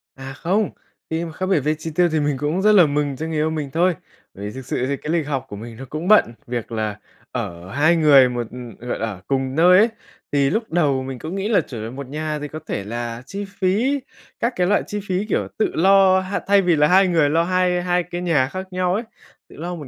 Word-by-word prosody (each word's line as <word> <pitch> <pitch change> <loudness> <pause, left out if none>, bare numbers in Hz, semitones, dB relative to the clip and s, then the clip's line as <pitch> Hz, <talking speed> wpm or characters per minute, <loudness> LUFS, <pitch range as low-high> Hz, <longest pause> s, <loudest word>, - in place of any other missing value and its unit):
À, 135 0 -8
không, 185 +8 0 0.4
khi 160 +1 -2
mà 165 - -7
khác 185 +4 -4
biệt 185 -4 +2
về 150 +3 0
chi 155 +1 -6
tiêu 175 0 +4
thì 155 - +1
mình 145 -2 0
cũng 150 +7 -1
rất 215 +2 +5
là 185 -6 +7
mừng 145 -1 -1
cho 155 - -5
người 160 - -4
yêu 155 +1 +1
mình 155 -3 -3
thôi. 175 +3 +2 0.4
Bởi 100 - -8
vì 105 - -4
thực 130 +2 -9
sự 125 0 -2
thì 140 0 -1
cái 150 - -5
lịch 165 -4 0
học 135 -3 -2
của - - -7
mình 115 +2 -9
nó 135 - -8
cũng 155 +4 -4
bận, 205 - +5
việc 120 -1 -4
là 110 -2 -3 0.3
ở 95 -7 -5
hai 155 +6 +3
người 145 -5 +6
một 120 -2 -3
ừ, 120 -1 -9
gọi - - -2
là, 115 - -1
ở 95 -4 -7
cùng 135 -1 -1
nơi 180 +3 +6
ấy, 220 +4 +5 0.4
thì 140 -1 +2
lúc 220 +9 0
đầu 145 -6 +1
mình 130 -1 -6
cũng 160 +8 -5
nghĩ 195 +1 -2
là 225 - +4
trở 115 -4 -8
về 110 - -5
một 135 +2 -7
nhà 150 +2 -3
thì 150 - -5
có 155 +2 -7
thể 100 - -3
là 115 +2 -5
chi 200 +7 -5
phí, 220 +9 +1 0.4
các 235 +2 0
cái 180 -1 +1
loại 205 - +2
chi 210 - -3
phí, 185 +2 -1
kiểu, - - -1
tự 220 - +1
lo 190 +1 +5
ha. 190 +1 -3
Thay 200 0 +5
vì 180 -3 +3
là 150 0 +4
hai 190 +3 +5
người 165 -5 +3
lo 165 +3 +2
hai 180 0 +1
hai 180 0 +1
cái 175 +1 -6
nhà 155 -7 +2
khác 185 +6 -6
nhau 180 0 0
ấy, 215 +5 -1 0.5
tự - - -15
lo 175 +3 -4
một 150 -5 -8
155 Hz, 265 wpm, -21 LUFS, 130-180 Hz, 0.5 s, là